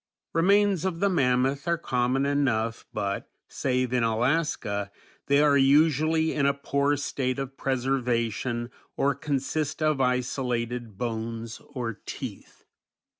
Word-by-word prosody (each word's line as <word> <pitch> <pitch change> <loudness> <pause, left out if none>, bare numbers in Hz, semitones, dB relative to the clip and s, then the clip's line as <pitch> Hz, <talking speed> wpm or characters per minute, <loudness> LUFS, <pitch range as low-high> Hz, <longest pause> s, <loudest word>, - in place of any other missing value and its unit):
Remains 195 +1 +3
of 185 -3 -2
the 200 +1 +2
mammoth 135 -1 +1
are 170 0 +2
common 130 -2 0
enough 120 -6 0
but, 100 -2 -3 0.2
save 125 -2 -1
in 125 - +2
Alaska, 115 -3 0 0.4
they 140 +1 +4
are 145 -1 +5
usually 155 +3 +3
in 140 -2 +2
a 140 - +2
poor 140 +1 +1
state 130 -2 -2
of 135 -1 -5
preservation 120 -3 -1 0.3
or 140 +1 +2
consist 140 +2 -2
of 155 -3 +2
isolated 125 -3 -1
bones 115 0 -4
or 115 -4 -4
teeth. - - -8
135 Hz, 125 wpm, -27 LUFS, 120-145 Hz, 0.4 s, are